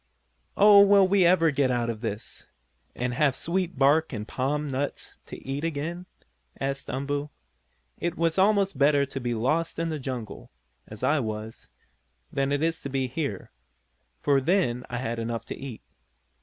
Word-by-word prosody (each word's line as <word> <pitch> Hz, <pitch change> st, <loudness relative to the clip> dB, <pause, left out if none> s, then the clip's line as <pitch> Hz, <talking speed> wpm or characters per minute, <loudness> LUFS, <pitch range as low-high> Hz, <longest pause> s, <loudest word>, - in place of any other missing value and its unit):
"Oh, 200 Hz, 0 st, +8 dB
will 200 Hz, -1 st, +6 dB
we 190 Hz, -2 st, +4 dB
ever 165 Hz, -3 st, +4 dB
get 140 Hz, -2 st, +1 dB
out 120 Hz, -2 st, 0 dB
of 115 Hz, -2 st, -4 dB
this, 110 Hz, -2 st, -5 dB, 0.5 s
and 125 Hz, 0 st, -2 dB
have 140 Hz, +1 st, +2 dB
sweet 180 Hz, +4 st, -2 dB
bark 145 Hz, +4 st, +3 dB
and 105 Hz, -4 st, -5 dB
palm 145 Hz, +3 st, -1 dB
nuts 140 Hz, +1 st, -4 dB
to -, -, -8 dB
eat 135 Hz, +3 st, -3 dB
again?" 165 Hz, +3 st, -3 dB, 0.5 s
asked 135 Hz, 0 st, -3 dB
Umboo. 145 Hz, +2 st, -2 dB, 0.7 s
"It 170 Hz, -, -2 dB
was 165 Hz, +2 st, +1 dB
almost 195 Hz, -5 st, +3 dB
better 140 Hz, 0 st, +4 dB
to 135 Hz, 0 st, -6 dB
be 120 Hz, -2 st, -2 dB
lost 155 Hz, +9 st, 0 dB
in 165 Hz, 0 st, -1 dB
the 155 Hz, -2 st, -3 dB
jungle, 125 Hz, -5 st, -6 dB, 0.4 s
as 110 Hz, -, -10 dB
I 155 Hz, +1 st, +3 dB
was, 110 Hz, -2 st, -5 dB, 0.6 s
than 135 Hz, 0 st, 0 dB
it 145 Hz, +2 st, 0 dB
is 165 Hz, 0 st, 0 dB
to 140 Hz, -, -5 dB
be 135 Hz, -1 st, -1 dB
here, 130 Hz, -, -4 dB, 0.7 s
for 140 Hz, -2 st, +3 dB
then 130 Hz, -7 st, +1 dB
I 125 Hz, -, -3 dB
had 120 Hz, -2 st, -3 dB
enough 115 Hz, 0 st, -3 dB
to -, -, -6 dB
eat. 130 Hz, -5 st, -8 dB
140 Hz, 170 wpm, -26 LUFS, 125-165 Hz, 0.7 s, Oh